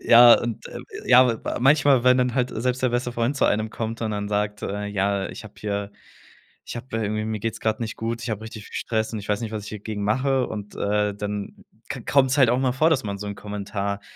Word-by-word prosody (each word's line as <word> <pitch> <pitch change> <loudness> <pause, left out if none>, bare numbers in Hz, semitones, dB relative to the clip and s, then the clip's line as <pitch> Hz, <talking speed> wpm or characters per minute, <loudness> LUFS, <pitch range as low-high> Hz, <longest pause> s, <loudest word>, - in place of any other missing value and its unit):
Ja, 120 0 +9
und, 120 -2 -4
ähm, - - -8 0.2
ja, 125 -2 +5
wa - - -2
manchmal, 140 -2 +5
wenn 125 0 +6
dann 125 -1 +1
halt 125 -1 +1
selbst 125 +3 -1
der 130 - +4
beste 120 0 -1
Freund 120 +4 0
zu - - +2
einem 110 +1 +1
kommt 115 0 -4
und 110 - -1
dann 105 -1 -3
sagt, 105 0 -1
äh: 105 +1 -3
„Ja, 100 -1 0
ich - - -9
hab 105 - -13
hier 100 -1 -3 0.7
ich - - -7
hab 125 +1 -9
irgendwie 110 -1 -1
mir 110 -1 -3
geht's 115 0 -3
grad 110 +1 0
nicht 115 -1 -4
gut, 115 +1 -3
ich 120 - -4
hab 110 -1 -3
richtig 110 -1 -9
viel - - -14
Stress, 110 0 -1
und 110 - -3
ich 100 - -9
weiß 105 +1 0
nicht, 110 -1 -5
was 105 -2 -4
ich 105 - -8
hier 105 -2 -7
gegen 105 -1 -4
mache.” 130 +4 +1
Und, 105 -1 -7
äh, 105 0 0
dann 105 0 -5 0.3
ko - - -6
kommt's 135 0 +3
halt 130 -4 +6
auch 125 - +2
mal 130 -2 +1
vor, 155 +5 +3
dass 135 -7 +1
man 100 -1 -4
so 105 - -6
'n 100 - -4
Kommentar 100 0 -4
110 Hz, 255 wpm, -24 LUFS, 105-125 Hz, 0.7 s, Ja